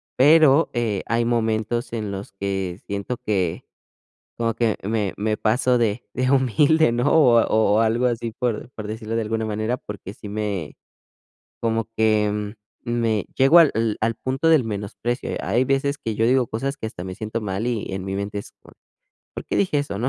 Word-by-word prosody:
pero, 155 +2 +5
eh, 115 -5 -1
hay 115 0 0
momentos 115 +1 -1
en 105 -3 -3
los 100 0 -6
que 95 -2 -3
siento 100 +5 -3
que, 95 -6 -1 0.7
como 115 -1 -1
que 115 -3 +1
me 105 -1 -1
me 105 +1 -1
paso 125 +3 +2
de, 115 0 0
de 130 +1 +1
humilde, 140 +3 +3
¿no? 120 +4 +1
O 125 -8 +6
o 110 -2 +2
o - - +4
algo 115 +3 +2
así, 115 -1 -2
por 120 +1 -3
por 105 -1 -7
decirlo 110 +1 -5
de 115 - +1
alguna 110 +1 -2
manera, 110 +3 -2
porque 100 -2 -9
sí 105 - -9
me 100 -7 -3 0.8
como 115 -1 0
que 105 -1 +1 0.3
me, 115 -4 0
llego 135 +6 +6
al 115 -9 +3
al 115 +1 0
punto 135 +5 -1
del 160 -5 +5
menosprecio. 110 +3 -4
Hay 125 +3 +1
veces 140 +1 0
que 110 -5 -4
yo 115 - +2
digo 125 0 +3
cosas 135 +5 -3
que 110 - -6
hasta 90 -5 -8
me 95 0 -6
siento 110 +1 -4
mal, 100 +2 -3
y 115 -4 -2
en 95 0 -4
mi 95 0 -3
mente 100 +1 -4
es: - - -11
"¿Por-por - - -22 0.5
qué - - -2
dije 180 -7 +2
eso, 100 -9 -3
no?". 125 +3 0
115 Hz, 185 wpm, -23 LUFS, 105-125 Hz, 0.8 s, O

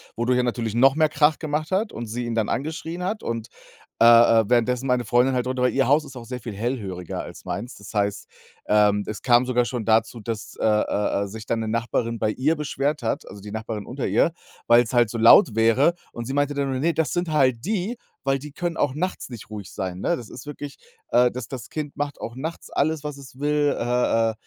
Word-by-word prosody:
wodurch 125 +2 +1
er 125 - +2
natürlich 115 -2 -2
noch 135 +3 +5
mehr 155 -1 +3
Krach 150 +1 +3
gemacht 155 +2 -2
hat 205 +4 0
und 120 - -6
sie 120 +3 -4
ihn 115 -1 -3
dann 110 -2 0
angeschrien 160 +5 -3
hat 210 +4 -3
und, 115 -1 -4 0.5
äh - - +8
äh, 115 -2 +7
währenddessen 125 +2 +2
meine 125 -1 +2
Freundin 125 +4 +3
halt 125 0 0
drunter 130 0 -1
weil 125 - +2
ihr 135 -2 +2
Haus 150 +2 +3
ist 135 -2 -12
auch 120 -2 -8
sehr 125 +1 -6
viel 115 -2 -7
hellhöriger 100 -6 -4
als - - -10
meins. 120 +5 -5
Das 100 +2 -12
heißt, 100 -1 -1 0.4
ähm, 105 -1 +3
es 105 - -5
kam 120 0 +4
sogar 125 -1 +1
schon 120 -3 -3
dazu, 115 +1 +2
dass, 110 0 -5
äh - - 0
äh 105 -1 +1
äh, - - -4
sich 105 +2 -9
dann 115 - 0
'ne 110 - -3
Nachbarin 115 0 -1
bei 110 - +1
ihr 145 +8 +1
beschwert 145 -1 -2
hat 110 - -2
also, 100 - -10
die 105 0 -9
Nachbarin 110 -2 -5
unter 130 +1 -4
ihr, 110 - +3 0.4
weil's 120 +1 +5
halt 120 -3 +4
so 115 - -4
laut 115 0 +7
wäre 115 +9 +4 0.2
und 120 -1 -6
sie 135 - -4
meinte 145 0 +1
dann 140 -1 -1
nur: 130 - -2
„Ne, 165 +3 +1
das 160 -2 0
sind 175 -1 -1
halt 130 -3 +2
die, 215 +3 -2 0.3
weil 135 0 +1
die 150 +1 -9
können 170 +2 -3
auch 130 - +1
nachts 180 -1 -3
nicht 115 -3 -10
ruhig 105 -3 -8
sein”, 95 -1 -4
ne? 175 - +1
Das 115 - -10
ist 130 - -10
wirklich 145 -1 -7 0.3
äh, 125 0 +5
das 125 -1 -6
das 130 -4 -7
Kind 150 -2 -5
macht 145 -1 -3
auch 115 - -6
nachts 160 +5 -6
alles, 155 +1 0
was 150 -1 -5
es 135 -1 -13
will, 145 0 +1
äh 120 -1 +1
äh, - - -9
125 Hz, 240 wpm, -24 LUFS, 115-145 Hz, 0.5 s, äh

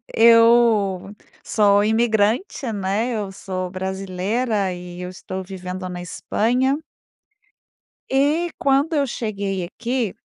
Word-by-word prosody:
eu 230 -4 +5 0.3
sou 205 -1 +3
imigrante, 220 - +1
né, 205 +4 -1
eu 210 -3 -3
sou 185 -1 -5
brasileira 190 +3 -2
e 180 0 -8
eu 180 - -5
estou 185 +1 -6
vivendo 185 0 -6
na 180 0 -6
Espanha. 250 - 0 1.3
E 295 +6 +2
quando 280 +4 +2
eu 285 -2 +2
cheguei 200 -6 -3
aqui 235 +3 -3
205 Hz, 105 wpm, -21 LUFS, 185-240 Hz, 1.3 s, eu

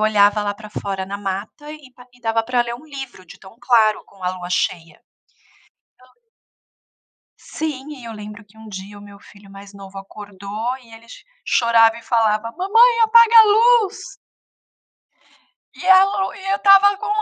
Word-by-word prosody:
olhava 210 -1 +2
lá 205 0 -3
pra 210 0 -13
fora 195 -2 -5
na 200 +1 -7
mata 205 +9 -7
e 295 -4 -13
pa 250 0 -17
e - - -22
dava 225 -1 -1
pra 245 +1 0
ler 235 0 -6
um 300 +6 -14
livro, 270 - -10
de - - -15
tão 190 +5 -17
claro 220 -4 +2
com 195 -2 -14
a 180 - 0
lua 180 -1 -9
cheia. 170 -2 -3 1.0
Então 255 - -22 1.3
Sim, 300 -2 -6
e 245 - -13
eu 230 - -8
lembro 210 +1 -11
que 210 +2 -24
um 220 - -13
dia 200 +1 -10
o - - -14
meu 200 0 -15
filho 200 -1 -18
mais 200 +1 -14
novo 195 -1 -13
acordou, 205 +4 -7
e 230 -2 -20
ele 225 +1 -15
cho - - -14 0.2
chorava 230 -1 +3
e 235 - -12
falava: 225 -1 0
"Mamãe, 455 - +3
apaga 465 +1 +5
a 440 - +9 0.4
luz". 385 - -8 1.8
E 365 - -9
a 380 0 +7
lu 390 -1 -3
e 390 0 -7
eu - - +1
estava 400 0 +5
com 425 +2 -8
225 Hz, 180 wpm, -19 LUFS, 200-295 Hz, 1.8 s, a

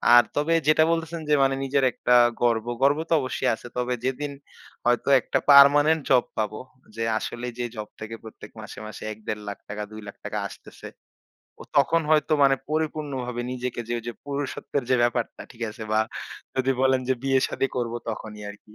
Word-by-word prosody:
আর 120 - +9
তবে 150 +3 +1
যেটা 155 +1 +6
বলতেছেন 165 0 -2
যে - - +4
মানে 135 0 +2
নিজের 135 0 +1
একটা 125 - +2 0.3
গর্ব। 115 -2 +2 0.2
গর্ব 140 +2 +4
তো - - +3
অবশ্যই 130 - -1
আছে। 120 - -11
তবে 125 0 0
যেদিন 140 +3 -2 0.5
হয়তো 120 +2 +2
একটা - - 0
পার্মানেন্ট 145 +3 +7
জব 125 -2 +5
পাবো। 110 -1 -2 0.4
যে 115 - -2 0.2
আসলে 120 +2 -5
যে 120 - -2
জব 105 -1 -5
থেকে 110 +1 -6
প্রত্যেক 110 - -11
মাসে, 110 - -10
মাসে 110 - -9
১-১.৫ 105 0 -6
লাখ 100 - -6
টাকা, 105 +1 -4
২ 110 0 -8
লাখ 100 - -8
টাকা - - -3
আসতেছে। - - -12 0.7
ও - - -8
তখন 155 +4 +4
হয়তো 155 0 +3
মানে 135 0 +5
পরিপূর্ণভাবে 145 -6 -2
নিজেকে 125 -1 -4
যে 120 - -2
ওইযে 120 +1 -6
পুরুষত্বের 140 -1 -3
যে 130 - +5
ব্যাপারটা, 120 0 -1
ঠিক 120 - -18
আছে? 110 +1 -8
বা 110 - +3 0.6
যদি 130 0 +2
বলেন 130 0 +4
যে - - +5
বিয়ে 135 -1 +3
শাদি 135 - -1
করবো 120 -1 -2
তখনই 110 -1 -6
আরকি। 105 +1 -13
125 Hz, 180 wpm, -25 LUFS, 115-140 Hz, 0.7 s, আর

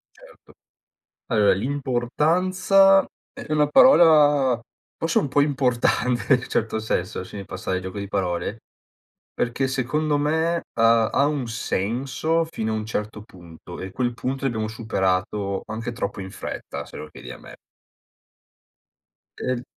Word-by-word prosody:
Certo, - - -19 0.7
allora 105 -4 +3
l'importanza 160 - +2 0.3
è - - -7
una 150 -1 +3
parola 150 - +6 0.4
forse 165 - +1
un 145 - -1
po' 145 +2 +3
importante, 125 -3 +1
in 125 - +1
un - - -9
certo 110 0 -1
senso, 95 -4 -2
lasciami 100 +2 -8
passare 95 0 -4
il 95 - -4
gioco 95 +2 -6
di 100 0 -5
parole 95 +2 -2 0.7
perché 125 +3 -1
secondo 145 +4 0
me, 160 +3 0
ha 115 0 +4
ha 140 - +2
un 145 -4 -1
senso 130 - -1
fino 110 0 -2
a - - -1
un 110 0 -3
certo 105 -1 -4
punto 85 -3 -12
e 95 - -6
quel 120 +3 -1
punto 130 +3 -4
l'abbiamo 110 -5 -1
superato 100 -2 -1
anche 115 +2 -4
troppo 100 -4 -4
in 95 -1 -7
fretta - - -6
se - - -11
lo 75 - -7
chiedi - - -11
a - - -10
me. - - -13 1.8
E - - -6
l 120 - -7
120 Hz, 145 wpm, -23 LUFS, 105-145 Hz, 1.8 s, parola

